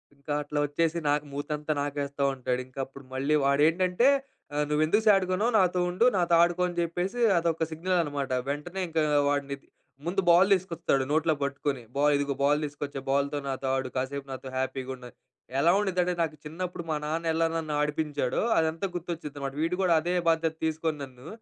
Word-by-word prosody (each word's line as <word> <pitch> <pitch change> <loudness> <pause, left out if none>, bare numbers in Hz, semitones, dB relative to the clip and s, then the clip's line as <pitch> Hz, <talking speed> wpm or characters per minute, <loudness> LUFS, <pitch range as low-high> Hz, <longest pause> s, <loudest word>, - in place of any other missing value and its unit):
ఇంకా 140 +1 -5
అట్లా 145 0 -3
వచ్చేసి 165 +3 0
నాకు 150 +1 +1
మూతంతా 150 +2 -3
నాకేస్తా 140 -1 -2
ఉంటాడు. 125 0 -2
ఇంక 130 - -24
అప్పుడు 135 +1 -13
మళ్ళీ 140 +3 +1
వాడేంటంటే 175 - +3 0.5
ఆహ్, 150 0 +1
"నువ్వు 150 +1 +2
ఎందుకు 210 +7 +2
సాడ్‌గా 190 -3 +4
ఉన్నావు? 225 +5 +1
నాతో 180 -2 +3
ఉండు 185 +7 +2
నాతో 175 -2 +2
ఆడుకో" 175 +1 +1
అని 175 - -6
జెప్పేసి 175 +7 -2 0.2
అదొక 165 -1 +1
సిగ్నల్ 180 +3 0
అనమాట. 140 -3 -3 0.2
వెంటనే 150 +7 -4
ఇంక 165 -1 -1 0.3
వాడిని 140 -1 0 0.5
ముందు 190 +3 0
బాల్ 180 +4 +6
తీసుకొస్తాడు, 165 -7 0
నోట్లో 160 +1 +3
పట్టుకొని. 140 -1 -2 0.2
బాల్ 145 +1 +4
ఇదిగో 140 0 -1
బాల్ 145 +1 +4
తీసుకొచ్చా 145 -1 -5
బాల్‍తో 140 +1 +1
నాతో 135 0 -3
ఆడు. 130 -1 -2
కాసేపు 135 +2 -3
నాతో 130 0 -7
హ్యాపీగా 130 0 -2
ఉండు 125 -1 -13
అని. - - -23 0.4
ఎలా 170 +4 +5
ఉండిద్దంటే 180 -3 +1
నాకు 155 -1 -3
చిన్నప్పుడు 175 +2 -5
మా 155 - +1
నాన్న 165 +1 -1
ఎలా 165 0 +2
నన్ను 155 -2 -3
ఆడిపించాడో 150 -3 -1 0.2
అదంతా 160 +4 +1
గుర్తొచ్చిద్దనమాట. 150 -5 -5
వీడు 165 +2 +1
గూడా 180 -3 +3
అదే 175 +2 -1 0.2
బాధ్యత 165 -1 +1
తీసుకొని 160 -1 -1
నన్ను 130 +2 -11
155 Hz, 175 wpm, -28 LUFS, 140-170 Hz, 0.5 s, బాల్